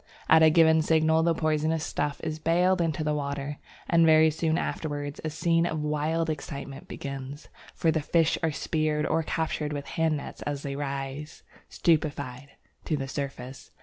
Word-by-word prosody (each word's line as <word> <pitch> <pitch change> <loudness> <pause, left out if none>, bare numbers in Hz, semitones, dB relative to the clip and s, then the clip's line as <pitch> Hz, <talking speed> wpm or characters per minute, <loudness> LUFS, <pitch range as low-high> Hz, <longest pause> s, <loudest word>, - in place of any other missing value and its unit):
At 160 0 +6
a 160 - +8
given 160 0 +5
signal 160 0 +3
the 165 0 +2
poisonous 155 0 0
stuff 145 -2 -2
is 155 0 -3
baled 175 +3 +2
into 160 -2 -1
the 150 0 0
river, 140 0 -3 0.3
and 165 -1 +4
very 160 0 +6
soon 160 +1 0
afterwards 145 -4 -3
a 155 - -1
scene 165 +2 +1
of 160 -2 -2
wild 155 +2 0
excitement 140 -2 -6
begins, 140 +1 -7 0.3
for 165 - +2
the 160 0 0
fish 165 +2 +2
are 160 -1 +1
speared 155 0 -1
or 165 - +1
captured 160 -2 -2
with 145 -1 -4
handnets 160 -3 -2
as 145 -1 -3
they 140 -1 -4
rise, 140 +2 -5 0.3
stupefied, 140 -5 0 0.4
to 155 - 0
the 135 -1 -4
surface. 135 -1 -6
155 Hz, 165 wpm, -27 LUFS, 145-160 Hz, 0.4 s, a